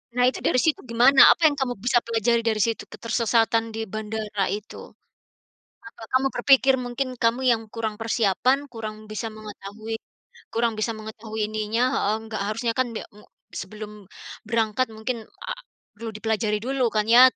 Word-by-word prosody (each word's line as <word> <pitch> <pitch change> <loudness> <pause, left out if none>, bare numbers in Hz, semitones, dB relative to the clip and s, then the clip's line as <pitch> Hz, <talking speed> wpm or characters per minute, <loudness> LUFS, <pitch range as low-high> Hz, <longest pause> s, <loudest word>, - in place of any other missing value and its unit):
Nah 250 - +3
itu - - -6
dari 255 - +3
situ 320 - +2
gimana, 250 +4 +6
apa - - +1
yang 295 - +1
kamu 260 -2 0
bisa 245 -1 +3
pelajari 230 0 +1
dari 220 -2 +1
situ 225 +2 +1
ketersesatan 230 -1 +1
di 225 0 -3
bandara 215 0 -3
itu? 210 +1 -7 1.0
Apa 230 - -12
kamu 260 +1 +4
berpikir 270 -1 +5
mungkin 250 +2 -2
kamu 230 +3 +2
yang 230 -1 +1
kurang 220 -2 -2
persiapan 225 +3 +2 0.2
kurang 220 -2 -5 0.2
bisa 215 +2 -3
mengetahui 215 +1 -7 0.6
kurang 230 0 +1
bisa 220 +2 0
mengetahui 220 0 -7
ininya 215 +2 -1
heeh, 210 +2 +1
nggak 220 -2 -4
harusnya 230 +2 -1
kan 255 - +3
be - - -3 0.2
mu - - -16 0.4
sebelum 210 +2 -8 0.6
berangkat 225 +2 +1
mungkin 230 +3 -3 0.3
a - - -1 0.4
perlu 225 +2 -6
dipelajari 215 -1 0
dulu 265 0 0
kan 215 0 +2
ya 245 - +10
225 Hz, 160 wpm, -24 LUFS, 215-240 Hz, 1.0 s, ya